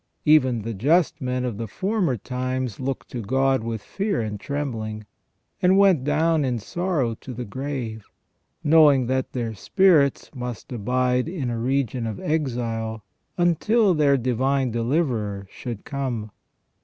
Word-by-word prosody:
Even 130 -7 +4
the 115 +1 -3
just 155 - +2
men 125 0 -1
of 115 -4 -4
the 115 - -3
former 185 - 0
times 130 0 -3
looked 130 0 -4
to 120 - -4
God 130 +3 +1
with 115 -2 -4
fear 200 0 -2
and 105 -2 -3
trembling, 110 -6 -4 0.6
and 185 +2 +5
went 195 -9 +5
down 155 +2 +2
in 125 -3 0
sorrow 150 - -1
to 125 - -8
the 125 +1 -5
grave, 120 -2 -5 0.6
knowing 150 -4 +6
that 130 +1 -1
their 115 -3 -2
spirits 155 - +3
must 125 -3 -6
abide 125 +4 0
in 145 -9 -3
a 115 - -3
region 125 -1 0
of 110 -3 -5
exile 115 -7 -2 0.3
until 185 +5 +3
their 145 -3 +3
Divine 130 +1 0
Deliverer 115 -5 -1
should 120 -5 -7
come. 125 -7 -3
130 Hz, 145 wpm, -24 LUFS, 115-150 Hz, 0.6 s, knowing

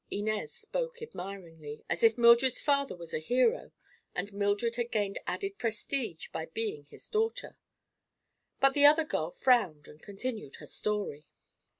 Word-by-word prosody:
Inez 215 +1 -2
spoke - - -4
admiringly, 170 - -8
as 160 - -2
if 225 +1 +5
Mildred's 235 +2 +6
father 280 -4 +1
was 170 -2 -9
a - - 0
hero 255 - +1 0.4
and 205 - -3
Mildred 205 +3 0
had 240 0 -2
gained 205 -3 -1
added 395 -1 -3
prestige 225 - -2
by 160 - -5
being 165 -5 -4
his - - -13
daughter. 450 +2 -1 1.0
But 275 0 +5
the 290 0 +8
other 305 +2 +6
girl 160 - -1
frowned 185 - +2
and 150 - -15
continued 210 - -5
her - - -11
story. 205 -8 -3
215 Hz, 145 wpm, -31 LUFS, 175-270 Hz, 1.0 s, the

